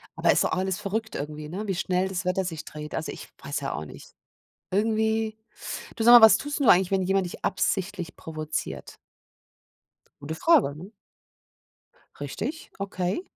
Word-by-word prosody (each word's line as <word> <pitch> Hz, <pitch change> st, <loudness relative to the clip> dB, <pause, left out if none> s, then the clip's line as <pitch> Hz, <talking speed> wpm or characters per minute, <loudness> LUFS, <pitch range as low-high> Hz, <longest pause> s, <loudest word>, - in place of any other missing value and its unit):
Aber -, -, +3 dB
ist -, -, +3 dB
doch -, -, 0 dB
auch -, -, 0 dB
alles 190 Hz, +1 st, -1 dB
verrückt 220 Hz, +2 st, -3 dB
irgendwie, 150 Hz, +1 st, -5 dB
ne, 205 Hz, +5 st, -5 dB
wie 195 Hz, -, -1 dB
schnell 185 Hz, +1 st, 0 dB
das 185 Hz, -1 st, -4 dB
Wetter 185 Hz, +1 st, 0 dB
sich 160 Hz, -3 st, -5 dB
dreht. 150 Hz, 0 st, -7 dB
Also, 155 Hz, -, -3 dB
ich -, -, -10 dB
weiß 140 Hz, +1 st, -3 dB
ja 135 Hz, -, -3 dB
auch 75 Hz, -, -4 dB
nicht. -, -, -13 dB, 0.6 s
Irgendwie 220 Hz, +1 st, +1 dB, 0.6 s
du, 225 Hz, -, -2 dB
sag 240 Hz, -, +8 dB
mal, 240 Hz, -, +11 dB
was 220 Hz, -, +6 dB
tust 290 Hz, +1 st, -4 dB
du 270 Hz, -, +2 dB
eigentlich, 185 Hz, +1 st, +5 dB
wenn 190 Hz, -1 st, +2 dB
jemand 195 Hz, 0 st, +1 dB
dich 175 Hz, -, -6 dB
absichtlich 190 Hz, -2 st, -1 dB
provoziert? 155 Hz, -1 st, -5 dB, 1.2 s
Gute 155 Hz, +3 st, -5 dB
Frage, 295 Hz, -, +4 dB
ne? 185 Hz, +7 st, -10 dB, 1.3 s
Richtig? 230 Hz, -, -5 dB
Okay. 195 Hz, -, -2 dB
190 Hz, 170 wpm, -26 LUFS, 160-215 Hz, 1.3 s, mal